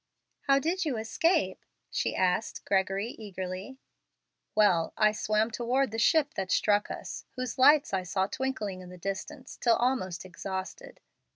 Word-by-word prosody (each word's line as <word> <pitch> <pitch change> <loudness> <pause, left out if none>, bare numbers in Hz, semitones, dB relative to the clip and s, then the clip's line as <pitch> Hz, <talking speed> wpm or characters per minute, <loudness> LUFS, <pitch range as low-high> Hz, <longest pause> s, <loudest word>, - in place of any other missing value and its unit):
"How 275 0 +6
did 340 +7 0
you 285 -7 -1
escape?" 325 +11 +1 0.3
she - - -1
asked 185 +4 0
Gregory, 195 +2 +1
eagerly. 190 +3 -6 0.8
"Well, 190 -6 +3
I 215 -1 +5
swam 215 +1 0
toward 245 +2 0
the 225 - -3
ship 300 +4 +3
that 190 -1 -3
struck 205 0 +2
us, - - -6
whose 255 -1 -4
lights 290 -1 +6
I 190 - +1
saw 190 +1 0
twinkling 210 -5 -3
in 180 - -11
the 180 - -10
distance, 195 - -6
till 235 -2 +4
almost 190 -9 -1
exhausted. 190 - -6
215 Hz, 150 wpm, -29 LUFS, 190-260 Hz, 0.8 s, How